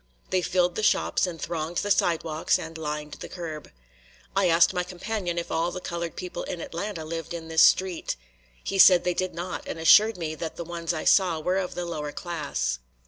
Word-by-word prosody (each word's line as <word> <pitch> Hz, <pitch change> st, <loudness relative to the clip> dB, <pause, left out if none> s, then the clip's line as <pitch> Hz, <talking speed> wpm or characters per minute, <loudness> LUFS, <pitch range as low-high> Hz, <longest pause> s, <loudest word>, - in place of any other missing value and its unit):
They 185 Hz, -, +2 dB
filled 180 Hz, 0 st, +1 dB
the 215 Hz, -, -3 dB
shops 210 Hz, -, +2 dB
and 170 Hz, -2 st, -6 dB
thronged 165 Hz, +1 st, -3 dB
the, 205 Hz, -, 0 dB
sidewalks 165 Hz, -3 st, +1 dB
and 165 Hz, 0 st, -8 dB
lined 150 Hz, -1 st, -5 dB
the -, -, -8 dB
curb. 160 Hz, -4 st, -7 dB, 0.7 s
I 195 Hz, -1 st, +3 dB
asked 170 Hz, +2 st, +5 dB
my 180 Hz, -, 0 dB
companion 180 Hz, 0 st, -4 dB
if 170 Hz, -, -3 dB
all 165 Hz, +1 st, +1 dB
the 180 Hz, -, -5 dB
colored 170 Hz, -2 st, -4 dB
people 180 Hz, -1 st, -5 dB
in 175 Hz, -, -5 dB
Atlanta 170 Hz, 0 st, -5 dB
lived 165 Hz, +1 st, -5 dB
in 165 Hz, -1 st, -7 dB
this 160 Hz, 0 st, +3 dB
street. 185 Hz, -1 st, +3 dB, 0.5 s
He 195 Hz, -, -2 dB
said 180 Hz, -1 st, +8 dB
they 180 Hz, -, +1 dB
did 185 Hz, -1 st, -2 dB
not 175 Hz, +2 st, -5 dB
and -, -, -4 dB
assured 210 Hz, +7 st, +6 dB
me 160 Hz, -3 st, -3 dB
that 160 Hz, 0 st, -5 dB
the 170 Hz, -, -5 dB
ones 170 Hz, 0 st, -3 dB
I 160 Hz, -2 st, -3 dB
saw 180 Hz, -5 st, +4 dB
were 180 Hz, +4 st, 0 dB
of 185 Hz, -2 st, -4 dB
the 175 Hz, -, -3 dB
lower 150 Hz, -3 st, -4 dB
class. 150 Hz, -, -3 dB
170 Hz, 205 wpm, -26 LUFS, 160-180 Hz, 0.7 s, said